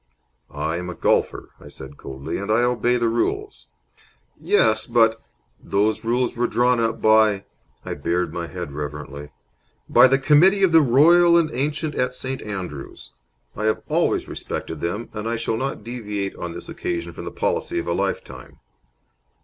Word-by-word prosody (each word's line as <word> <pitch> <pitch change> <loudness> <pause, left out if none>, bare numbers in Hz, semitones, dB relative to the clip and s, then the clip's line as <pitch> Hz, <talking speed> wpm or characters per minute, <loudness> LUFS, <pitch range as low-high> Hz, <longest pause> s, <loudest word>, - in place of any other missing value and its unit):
"I 80 +2 -3
am 90 0 -5
a 90 - -6
golfer," - - 0
I - - -13
said, 70 +2 -11
coldly, 70 +5 -6
"and 100 +2 -3
I 115 +3 +3
obey 125 0 +1
the 120 -1 +1
rules." 115 +1 -2 0.7
"Yes, 110 0 +2
but 115 -1 +3 0.2
" - - -37
"Those 110 +2 +2
rules 120 +2 0
were 120 +1 +1
drawn 125 0 +2
up 115 0 -1
by 110 -2 +4 0.2
" - - -38
I - - -3
bared 90 +1 -2
my 85 -1 -4
head 90 -4 -6
reverently 75 0 -7 0.6
"by - - +7
the 135 +1 +3
Committee 155 +8 +4
of 190 - +4
the 165 0 +7
Royal 170 +6 +5
and 165 -2 +2
Ancient 150 +3 -2
at 125 -1 -1
St. 130 +1 -4
Andrews. 90 - -7 0.4
I 110 - -3
have 110 - 0
always - - +1
respected 80 -2 -6
them, 100 +7 -3
and 105 +1 -4
I 115 - -1
shall 115 - -2
not 130 -2 -3
deviate 105 -4 -4
on 85 -1 -6
this - - -8
occasion 340 - -4
from - - -8
the - - -5
policy 345 - -2
of 345 - -2
a - - 0
lifetime." 100 0 -4
115 Hz, 175 wpm, -22 LUFS, 90-130 Hz, 0.7 s, by